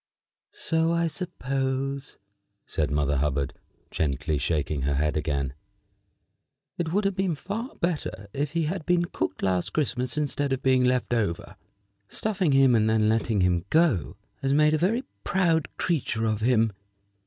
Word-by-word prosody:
"So 165 0 +1
I 170 0 +2
supposed," 135 -5 -2 0.5
said 75 - -1
Mother 75 -1 +1
Hubbard, 70 -1 0 0.4
gently 75 0 -1
shaking 75 -2 -1
her 70 +1 0
head 75 +1 +1
again. 70 -4 -1 1.3
"It 165 -2 -1
would 200 +3 +1
have 195 - +2
been 190 -4 0
far 215 - -5
better 155 - -3
if 145 +2 -2
he 170 -1 +1
had 165 +2 -2
been 175 -1 +3
cooked 95 - -3
last 90 -2 0
Christmas 130 -2 -1
instead 145 -2 0
of 130 - -3
being 130 -1 +4
left 125 -1 +1
over. 100 -8 -1 0.5
Stuffing 190 -7 0
him 135 -2 +5
and 110 -1 +3
then 110 -1 +3
letting 110 -2 +1
him 90 -1 +2
go 140 - +2 0.2
has 135 0 +1
made 150 +1 +4
a - - +3
very 220 - +1 0.2
proud 165 -5 +2
creature 130 -9 0
of 110 -1 0
him. 115 -2 +3
130 Hz, 155 wpm, -26 LUFS, -, 1.3 s, him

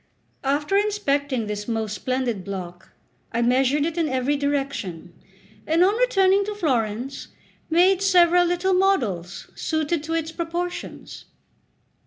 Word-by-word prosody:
After 290 +7 0
inspecting 285 - 0
this 210 0 -5
most 220 -2 -2
splendid 250 -3 -2
block, 180 -2 -7 0.4
I 235 +1 0
measured 265 +4 +2
it 335 +1 -2
in 320 -2 +1
every 260 +2 0
direction, 275 - -3 0.5
and 325 +3 +4
on 395 +3 +3
returning 400 -5 +3
to 420 0 -4
Florence, 255 - -2 0.4
made 360 +3 +4
several 355 -2 +5
little 355 +2 +1
models 230 - 0
suited 315 0 -1
to 325 +1 -2
its 325 -1 -2
proportions. 345 +2 -5
290 Hz, 125 wpm, -23 LUFS, 235-355 Hz, 0.5 s, several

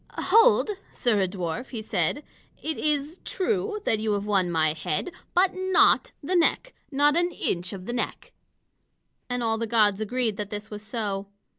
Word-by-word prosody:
"Hold, 450 +2 +5 0.2
sirrah 210 -6 +1
dwarf," 180 +4 -4
he 225 -4 -5
said. 205 - 0 0.4
"It 315 0 -3
is 300 +3 0
true 415 +2 -1
that 220 - +2
you 215 -1 0
have 200 0 -2
won 195 -4 +1
my 155 -2 +2
head, 155 - -3 0.2
but 370 +1 +4
not 375 0 +3
the 360 +6 -1
neck, 360 +8 +2 0.2
not 290 +1 +3
an 345 +1 +2
inch 175 - -2
of 185 -2 -8
the 240 - -4
neck." 245 - -4 1.0
And 245 -1 -2
all 225 -1 0
the 230 - -2
gods 215 -3 +3
agreed 225 -1 -1
that 210 -1 -4
this 210 +1 -7
was 210 0 -6
so. 205 -3 -4
225 Hz, 170 wpm, -26 LUFS, 200-315 Hz, 1.0 s, Hold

